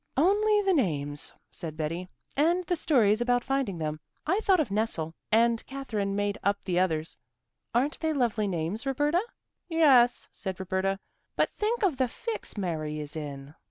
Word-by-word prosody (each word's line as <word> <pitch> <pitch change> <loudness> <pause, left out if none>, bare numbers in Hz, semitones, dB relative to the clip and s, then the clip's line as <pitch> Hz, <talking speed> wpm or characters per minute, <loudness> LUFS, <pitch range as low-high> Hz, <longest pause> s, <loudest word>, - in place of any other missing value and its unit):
"Only 415 +6 +4
the 385 -1 +3
names," 145 - 0 0.2
said 160 -4 -7
Betty, 165 +4 -3 0.3
"and 340 +5 +2
the 355 - +1
stories 235 -9 +3
about 245 0 +2
finding 270 -9 -1
them. 155 -1 -3 0.3
I 375 +7 +2
thought 390 -4 +3
of 290 -10 0
nestle, 200 -7 -1 0.2
and 230 +1 +3
Katherine 215 -8 -3
made 205 0 -1
up 200 0 +2
the 180 -2 +1
others. 160 -4 0 0.6
Aren't 275 +6 +1
they 320 -1 0
lovely 235 -7 +1
names, 185 - -2
Roberta?" 295 +6 +2 0.5
"Yes," 270 -7 +5
said 190 -1 -5
Roberta, 190 +1 -1 0.4
"but - - +2
think 445 +2 0
of 350 -9 +2
the 260 -1 +2
fix 445 - -5
Mary 155 -5 -2
is 150 0 -6
in." 145 -2 -6
220 Hz, 160 wpm, -28 LUFS, 175-295 Hz, 0.6 s, Yes